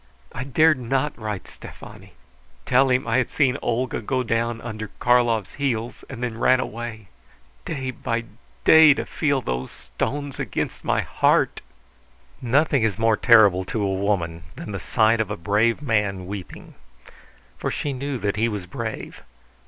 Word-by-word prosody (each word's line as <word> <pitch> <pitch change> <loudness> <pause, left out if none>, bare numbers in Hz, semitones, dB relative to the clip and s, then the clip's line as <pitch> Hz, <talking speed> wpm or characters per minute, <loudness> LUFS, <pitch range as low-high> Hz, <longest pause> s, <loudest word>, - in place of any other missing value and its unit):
I 125 - -5
dared 155 +1 +3
not 135 +4 -1
write 105 -4 -5
Stefani; - - -12 0.5
tell 135 +2 +4
him 125 +1 +1
I - - +2
had 130 - +1
seen 140 -2 +1
Olga 120 +1 -1
go 130 +3 -1
down 115 0 -1
under 110 -2 -6
Karlov's 120 -5 +2
heels, 120 -5 -3
and 125 -2 -7
then 115 -2 -3
ran 130 +1 +4
away!... 115 -3 -6 0.6
Day 130 -3 -3
by 115 -1 -3 0.4
day 160 -3 +8
to - - -3
feel 140 -4 0
those 65 - -3
stones 145 -1 -5
against - - -3
my - - +1
heart!" - - +1 0.8
Nothing 140 +3 +2
is 110 -4 0
more 115 -1 +3
terrible 105 -5 +5
to 105 +2 -2
a 95 -1 0
woman 95 -4 -1
than - - -7
the 100 - -4
sight 110 +2 +2
of 110 - -3
a 105 - -4
brave 110 - +1
man 105 -7 0
weeping. 95 -1 -8 0.9
For - - -2
she 145 - -3
knew 135 +1 -3
that 105 -2 -2
he 115 +2 +2
was 105 -4 -5
brave. 110 +5 -6
115 Hz, 160 wpm, -23 LUFS, 105-130 Hz, 0.9 s, day